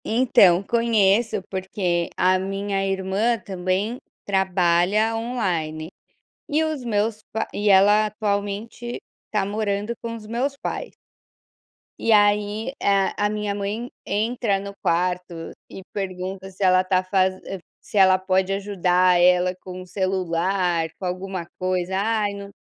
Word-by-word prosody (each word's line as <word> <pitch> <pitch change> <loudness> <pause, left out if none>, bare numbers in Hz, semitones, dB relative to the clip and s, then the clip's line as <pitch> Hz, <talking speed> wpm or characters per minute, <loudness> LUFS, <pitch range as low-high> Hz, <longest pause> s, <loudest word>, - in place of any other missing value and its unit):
Então 205 -6 +4
conheço, 225 -2 +2
porque 185 -3 -1
a 185 +1 +3
minha 195 +1 -2
irmã 195 +5 0
também 190 +4 -2 0.3
trabalha 190 +2 +2
online, 175 -10 -2 0.6
e 305 +2 +1
os 310 -5 -2
meus 215 -1 -1
p 220 - -1
e 205 0 +1
ela 205 +2 +6
atualmente, 210 +3 -3 0.3
está 210 -3 -1
morando 205 +1 -2
com 230 0 -4
os 220 -2 -9
meus 250 +5 -2
pais. - - -4 1.1
E 230 - +1
aí, 210 +3 +3
a 200 +1 +2
a - - +2
minha 210 -1 -2
mãe 205 +4 -4
entra 215 -1 0
no 200 0 -7
quarto, 180 -1 -1 0.2
e 190 - -9
pergunta 190 -1 -5
se 195 +1 -6
ela 185 0 +5
está 185 0 +1
faze 185 0 +1 0.4
se - - -5
ela 190 -1 +6
pode 190 0 +1
ajudar 185 -2 +2
ela 180 +1 +4
com 185 0 -8
o 185 - -11
celular, 180 -2 0
com 190 - -6
alguma 185 0 -4
coisa: 185 0 -1
"Ai, 210 0 0
não 200 0 -8
195 Hz, 135 wpm, -23 LUFS, 185-215 Hz, 1.1 s, ela